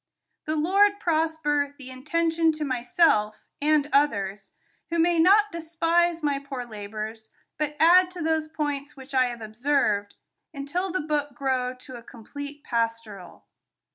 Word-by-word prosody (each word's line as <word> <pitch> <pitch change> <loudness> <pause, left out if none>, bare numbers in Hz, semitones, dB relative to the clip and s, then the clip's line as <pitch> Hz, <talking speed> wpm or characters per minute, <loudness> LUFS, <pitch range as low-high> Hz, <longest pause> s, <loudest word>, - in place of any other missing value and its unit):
The 310 - -1
Lord 400 +6 +3
prosper 310 -4 0
the 260 -3 -10
intention 325 +4 +1
to 305 -1 -4
myself, 245 -4 +2 0.2
and 300 -1 +2
others, 200 -9 +1 0.4
who 335 - -1
may 340 0 +3
not 410 +5 +5
despise 335 0 0
my 285 -2 0
poor 275 -3 -6
labors, 220 0 -7 0.3
but 300 -1 -2
add 360 +3 +6
to 365 -1 -8
those 315 -1 0
points 290 -2 -4
which 270 +1 -11
I 260 -1 +4
have 240 -2 -5
observed, 215 -2 0 0.4
until 285 +7 -3
the 370 - -1
book 295 -2 -2
grow 255 -1 -1
to 255 0 -11
a - - -11
complete 285 +6 -10
pastoral. 230 -5 -4
290 Hz, 140 wpm, -25 LUFS, 245-325 Hz, 0.4 s, add